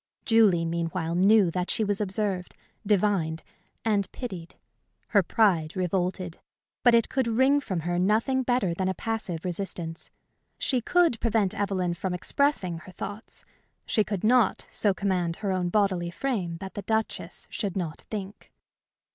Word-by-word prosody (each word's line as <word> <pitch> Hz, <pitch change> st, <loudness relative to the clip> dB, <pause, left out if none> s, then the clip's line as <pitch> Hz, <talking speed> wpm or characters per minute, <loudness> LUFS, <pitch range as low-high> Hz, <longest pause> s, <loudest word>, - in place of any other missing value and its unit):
Julie, 210 Hz, -8 st, +4 dB
meanwhile, 165 Hz, 0 st, -2 dB
knew 195 Hz, +1 st, +5 dB
that 180 Hz, +1 st, -2 dB
she 220 Hz, -, 0 dB
was 205 Hz, 0 st, 0 dB
observed, 195 Hz, -2 st, -1 dB, 0.3 s
divined, 195 Hz, -6 st, +1 dB, 0.4 s
and 205 Hz, -3 st, +1 dB
pitied. 185 Hz, -9 st, -7 dB, 0.5 s
Her 205 Hz, -, +5 dB
pride 175 Hz, -5 st, +2 dB
revolted, 180 Hz, -1 st, -1 dB, 0.4 s
but 245 Hz, -1 st, +6 dB
it 230 Hz, -, +3 dB
could 260 Hz, -3 st, 0 dB
wring 260 Hz, +5 st, +4 dB
from 190 Hz, -10 st, -3 dB
her 175 Hz, +2 st, -1 dB
nothing 225 Hz, +8 st, +2 dB
better 245 Hz, -8 st, +1 dB
than 185 Hz, +2 st, -1 dB
a 190 Hz, -, -1 dB
passive 210 Hz, -7 st, -3 dB
resistance. 175 Hz, -2 st, -4 dB, 0.5 s
She 255 Hz, -3 st, 0 dB
could 335 Hz, -3 st, +3 dB
prevent 220 Hz, -4 st, +1 dB
Evelyn 190 Hz, -3 st, -1 dB
from 180 Hz, +1 st, -3 dB
expressing 185 Hz, -, 0 dB
her 185 Hz, -, -12 dB
thoughts; 205 Hz, +4 st, -7 dB, 0.4 s
she 215 Hz, -, +2 dB
could 205 Hz, -3 st, -4 dB
not 235 Hz, -2 st, +3 dB
so 205 Hz, -, +2 dB
command 185 Hz, -4 st, -1 dB
her 200 Hz, 0 st, -2 dB
own 180 Hz, -1 st, 0 dB
bodily 185 Hz, -3 st, +1 dB
frame 180 Hz, -5 st, -2 dB
that 190 Hz, +2 st, -8 dB
the 205 Hz, -, -5 dB
Duchess 220 Hz, +2 st, -2 dB
should 200 Hz, -4 st, -3 dB
not 165 Hz, -4 st, -3 dB
think. 205 Hz, -1 st, -7 dB
195 Hz, 150 wpm, -27 LUFS, 175-220 Hz, 0.5 s, but